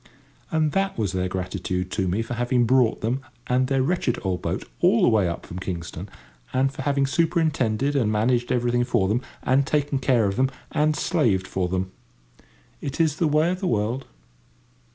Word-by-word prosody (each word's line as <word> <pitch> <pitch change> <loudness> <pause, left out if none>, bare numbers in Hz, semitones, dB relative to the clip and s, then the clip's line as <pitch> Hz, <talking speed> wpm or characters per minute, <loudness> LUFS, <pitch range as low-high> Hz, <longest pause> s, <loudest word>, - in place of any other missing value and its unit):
And 155 -1 +1
that 195 +2 0
was 105 -4 0
their 95 -1 -1
gratitude 90 0 -3
to 95 -3 -1
me 100 +6 0
for 115 - -5
having 120 +1 +1
brought 125 -1 +3
them 120 +5 -1 0.2
and 130 +1 +1
their 135 -1 +1
wretched 140 -5 0
old 95 -3 -1
boat - - -3
all - - +4
the - - +6
way 105 -5 +3
up 85 - -5
from 90 - -7
Kingston, 90 0 -5 0.4
and 135 +1 +1
for - - -6
having 140 0 +1
superintended 145 -5 +1
and 115 -6 +2
managed 120 +3 +1
everything 120 0 +2
for 120 -5 +1
them, 110 +5 +1 0.2
and 135 +2 +2
taken 145 -2 0
care 125 -4 +2
of 100 +1 -1
them, 130 +1 +3 0.2
and 155 0 +2
slaved 115 - +1
for 90 -1 -2
them. 95 +1 -2 0.9
It 140 +2 -5
is 155 -3 +2
the 165 - +2
way 155 +3 +3
of 185 - -3
the 190 - -2
world. 115 +3 -1
125 Hz, 190 wpm, -24 LUFS, 105-140 Hz, 0.9 s, the